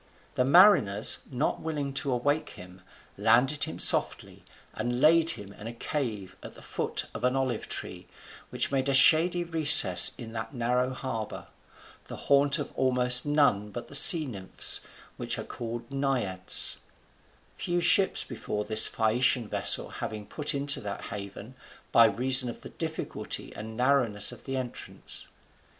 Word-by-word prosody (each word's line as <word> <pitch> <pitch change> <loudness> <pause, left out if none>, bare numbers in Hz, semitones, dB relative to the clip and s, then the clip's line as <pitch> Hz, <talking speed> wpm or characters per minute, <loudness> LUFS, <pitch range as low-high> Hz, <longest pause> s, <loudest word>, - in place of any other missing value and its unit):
The 125 - 0
mariners, 135 - +4
not 135 +2 -3
willing 145 -4 -5
to 140 - -4
awake 145 +5 -2
him, 90 +1 -14 0.4
landed 125 +6 +2
him - - -8
softly, - - +4 0.3
and 120 0 -4
laid 160 +3 +3
him 100 -1 -12
in 105 - -11
a 115 - -7
cave 110 -7 -6
at - - -12
the - - -15
foot - - -4
of - - -9
an 125 +1 0
olive 130 -4 -3
tree, - - -6 0.4
which - - -1
made 135 0 -1
a 135 - +1
shady 165 +6 +4
recess 160 -3 +6
in 115 -2 -10
that 110 +3 -7
narrow 125 +1 -1
harbour, 115 -5 -7 0.6
the - - -9
haunt 140 +1 +1
of 145 - -6
almost 125 0 +1
none 140 -9 +1
but 120 +3 -9
the - - -14
sea 155 +3 +5
nymphs, 100 -8 -1 0.4
which - - -1
are - - -6
called 120 +1 -8
Naiads; 125 -10 -1 0.8
few 175 0 -3
ships 190 +2 +2
before 105 0 -6
this 110 0 +5
Phaeacian 120 +1 0
vessel - - +2
having 105 -1 -7
put 150 +4 -4
into 140 0 -1
that 100 -1 -7
haven, 100 +4 -9 0.4
by 115 - +5
reason 125 +3 +3
of 120 - -10
the - - -11
difficulty - - -7
and 110 +1 -9
narrowness 125 -6 +1
of - - -14
the 135 -1 -5
entrance. 125 -2 -8
125 Hz, 155 wpm, -26 LUFS, 110-140 Hz, 0.8 s, recess